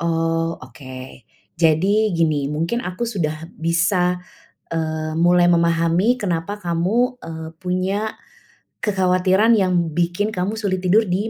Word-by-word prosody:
Oh, 165 0 0
oke. 130 -1 -11 0.3
Jadi 185 +6 +3
gini, 155 -4 +1
mungkin 170 +11 -2
aku 185 +6 -3
sudah 160 -6 -3
bisa, 180 +2 +1 0.5
eee, 155 -1 -2
mulai 175 +1 +4
memahami 170 +6 +2
kenapa 180 0 -2
kamu, 210 +10 0
eee, 160 -1 -6
punya 190 +4 -2 0.7
kekhawatiran 190 +2 +3
yang 190 -3 +2 0.2
bikin 175 +6 0
kamu 190 +4 -2
sulit 190 -4 -1
tidur 210 +5 +4
di 195 +4 -1
175 Hz, 115 wpm, -21 LUFS, 165-195 Hz, 0.7 s, mulai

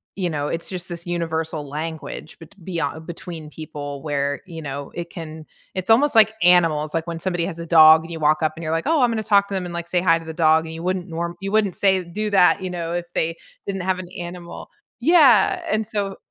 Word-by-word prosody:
you 185 -3 -1
know, 145 -2 -2
it's 165 - -3
just 180 -1 -6
this 170 0 -7
universal 160 -3 -2
language 155 +1 -6
bet 165 +4 -14
beyond 165 -2 -3
between 165 -2 -8
people 145 -2 -7
where, 145 -1 -1
you 165 -3 -8
know, 140 -1 -6
it 170 0 -6
can 160 -2 -8 0.3
it's 185 +2 -5
almost 260 +3 +4
like 220 0 +6
animals. 165 -4 +4
Like, 165 +1 -2
when 165 -1 -4
somebody 175 -2 -1
has 170 -2 -6
a 170 - -5
dog 160 -1 +8
and 165 - -10
you 165 - -5
walk 155 +1 +2
up 155 - +2
and - - -7
you're 155 +1 -2
like, 165 - 0
"Oh, 320 -4 +3
I'm 245 - +4
gonna 220 -1 -2
talk 200 -1 +3
to 200 - -7
them 190 -1 -1
and, 175 - -6
like, 170 0 -5
say 175 0 +1
hi 165 -2 +3
to 165 - -12
the 160 - -6
dog," 160 0 +3
and 160 - -7
you 165 +1 -7
wouldn't 185 0 -2
norm 170 +1 -4
you 195 0 -4
wouldn't 205 -4 +2
say 190 -2 +3
do 210 +5 -4
that, 190 -2 +4
you 185 - -3
know, 170 -2 -4
if 175 0 -2
they 165 +1 -1 0.3
didn't 195 -2 -3
have 185 0 0
an 180 -1 -8
animal. 175 0 -8 0.3
Yeah, 270 - +5
and 215 0 0
so 200 -3 -3
170 Hz, 245 wpm, -22 LUFS, 160-190 Hz, 0.3 s, dog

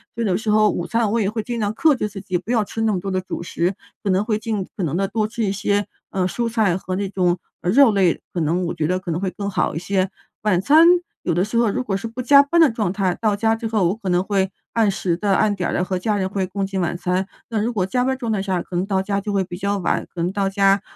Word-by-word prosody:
所 230 - -2
以 - - 0
有 185 - +2
时 220 +3 -2
候 215 0 +5
午 175 -3 -2
餐 230 -1 +1
我 230 +1 +1
也 195 - +1
会 220 0 -3
尽 240 +1 -4
量 205 -2 0
克 310 +2 +4
制 210 -4 -2
自 200 -1 -8
己， 185 -2 -1
不 180 - -14
要 230 -3 +3
吃 225 +2 -5
那 225 -1 +2
么 190 - 0
多 195 +2 -4
的 185 0 0
主 185 - -6
食， 175 +2 -1 0.3
可 205 - -1
能 190 +1 +2
会 215 -2 0
尽 215 -3 -2
可 - - -5
能 160 -2 -1
地 195 +1 +1
多 215 +1 -1
吃 225 +1 -3
一 200 - +1
些， 205 0 0 0.2
呃， 185 -2 0
蔬 235 +5 -2
菜 215 -6 +2
和 185 0 -4
那 200 +1 -1
种， 180 -2 +1 0.2
嗯， 175 - 0
肉 265 +1 +6
类， 190 -4 +2
可 180 - -2
能 170 +4 0
我 170 - -2
觉 155 - -1
得 180 +2 +1
可 175 -2 -5
能 165 - -1
会 195 - 0
更 200 +1 -4
好 195 - 0
一 - - -1
些。 185 +1 0 0.3
晚 195 -4 +2
餐 310 - +6 0.4
有 175 - 0
的 175 +3 +2
时 215 +3 -2
候 235 -2 +3
如 255 +5 -2
果 195 -5 -1
是 200 - -5
不 230 +3 -6
加 280 +3 +7
班 335 +4 +2
的 320 - +7
状 215 -5 -1
态， 190 -3 0
到 215 -2 +1
家 225 +2 +2
之 225 0 -4
后 215 -5 +2
我 190 - -1
可 205 - -8
能 180 0 +2
会 195 -1 0 0.2
按 225 -3 +3
时 180 -3 -1
地 200 +1 +1
按 215 +1 +3
点 180 -3 -2
儿 - - -2
地 - - +1
和 185 0 -2
家 210 +2 0
人 190 -1 -1
会 195 -1 -1
共 195 +1 -2
进 195 0 -3
晚 175 -1 -1
餐， 180 +2 -1 0.2
那 225 -2 -1
如 235 +3 -1
果 190 -5 0
加 250 +7 0
班 265 - +1
儿 - - -11
状 235 -3 -3
态 210 -3 0
下， 190 -2 -1
可 180 - -8
能 180 - 0
到 195 -1 0
家 200 +1 -1 0.3
比 175 - -5
较 200 +1 -1
晚， 180 - 0
可 170 - -4
能 175 - 0
到 195 0 0
家 195 0 +3
200 Hz, 330 characters per minute, -21 LUFS, 185-220 Hz, 0.4 s, 加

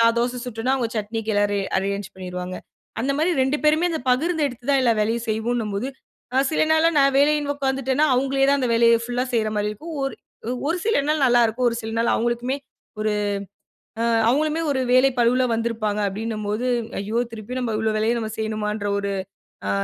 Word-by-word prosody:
நான் 230 0 +4
தோசை 245 +1 -1
சுட்டன்னா, 245 +3 -1
அவுங்க 235 -4 -2
சட்னிக்கு 220 +1 -2
எல்லாமே 205 0 +2 0.2
அரேஞ்ச் 200 0 -2
பண்ணிருவாங்க. 180 -1 -6 0.4
அந்தமாரி 280 +7 +1
2 265 +3 +1
பேருமே 310 +3 +4
அந்த 320 - -2
பகிர்ந்து 315 +4 +1
எடுத்து 245 0 -8
தான் 275 - +4
எல்லா 235 - +4
வேலையும் 230 +3 0
செய்வோன்னும்போது, 220 0 -1 0.5
அ - - +3
சில 310 - +2
நாள்லாம் 315 0 +3
நான் 275 0 +4
வேலன்னு 290 0 +3
உக்காந்துட்டேன்னா, 270 +1 +1
அவுங்களே 270 +1 +2
தான் 280 0 +4
அந்த 250 - 0
வேலைய 230 0 +5
ஃபுல்லா 245 +1 -1
செய்றமாரி 215 -2 0
இருக்கும். 315 +10 -8
ஒரு, 270 - -3 0.5
ஒரு 335 +3 0
சில 445 -11 +3
நாள் 305 -3 +2
நல்லாயிருக்கும், 240 0 +3
ஒரு 230 - -3
சில 220 - -5
நாள் 230 - +2
அவுங்களுக்குமே 240 +3 -1 0.4
ஒரு 215 0 +1 0.9
ஆ - - +1 0.2
அவுங்களுமே 305 +5 +1
ஒரு 265 - 0
வேலை 255 +2 +6
பளுவுல 245 +2 +3
வந்திருப்பாங்க. 225 -2 -1
அப்பிடினம்போது 215 +2 -3 0.3
ஐயோ! 210 +4 -2
திருப்பி 225 +3 -7
நம்ம 240 -3 -2
இவ்வளவு 220 0 0
வேலைய 220 +2 +1
நாம் 220 -1 -4
செய்யணுமான்ற 215 -1 -2
ஒரு 200 0 -2 0.6
ஆ - - +1
235 Hz, 170 wpm, -23 LUFS, 215-270 Hz, 0.9 s, வேலை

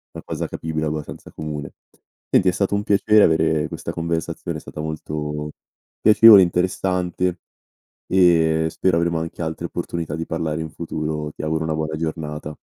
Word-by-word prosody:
una - - -7
cosa - - -3
capibile 80 -1 -3
abbastanza 75 0 -6
comune. 75 -2 -6 0.6
Senti 95 - +4
è - - +2
stato 100 +2 -1
un 100 - -1
piacere 105 +1 +4
avere 80 -1 +2
questa - - -6
conversazione 85 -1 -3
è - - -9
stata - - -10
molto 75 -1 -4 0.5
piacevole, 110 -1 +9
interessante 90 0 -1 0.7
e 80 -3 +4
spero 95 0 +1
avremo 85 -1 +1
anche 80 0 -6
altre 80 +1 -4
opportunità 85 -2 -4
di 80 +1 -4
parlare 80 -1 -2
in 80 -1 -6
futuro. 75 -2 -4
Ti - - -8
auguro 80 +1 -1
una 80 -1 -1
buona 80 0 -2
giornata. 75 -1 -4
80 Hz, 155 wpm, -22 LUFS, 75-85 Hz, 0.7 s, piacevole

